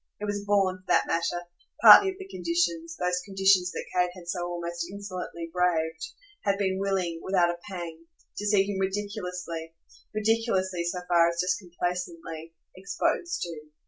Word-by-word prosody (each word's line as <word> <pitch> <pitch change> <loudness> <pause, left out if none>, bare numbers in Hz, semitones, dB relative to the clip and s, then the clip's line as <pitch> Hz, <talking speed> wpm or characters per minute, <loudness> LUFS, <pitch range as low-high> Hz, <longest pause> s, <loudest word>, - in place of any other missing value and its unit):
It 210 - -3
was 205 0 -2
born, 195 -2 +3
for 185 - -25
that - - +4
matter, 170 +1 -1 0.4
partly 395 - +10
of 380 - -5
the 385 -1 -9
conditions, 335 -2 -1
those 180 0 0
conditions 195 -2 +3
that - - -5
Kate 180 -1 +2
had 175 -2 -12
so 175 0 -2
almost 170 0 -4
insolently 185 -4 -6
braved, 170 -3 +1 0.4
had 200 -1 +1
been 190 -1 0
willing, 190 -4 -1
without 180 -2 +2
a 175 - -8
pang, 165 -3 -7 0.3
to 205 - -3
see 205 -2 +4
him 195 -1 -3
ridiculously 180 -4 -4 0.4
ridiculously 210 -5 0
so 180 +1 -2
far 170 -1 +5
as 170 0 -5
just 180 0 +1
complacently 170 -3 -5 0.2
exposed 345 - -1
to. 160 -3 -7
180 Hz, 160 wpm, -27 LUFS, 170-200 Hz, 0.4 s, partly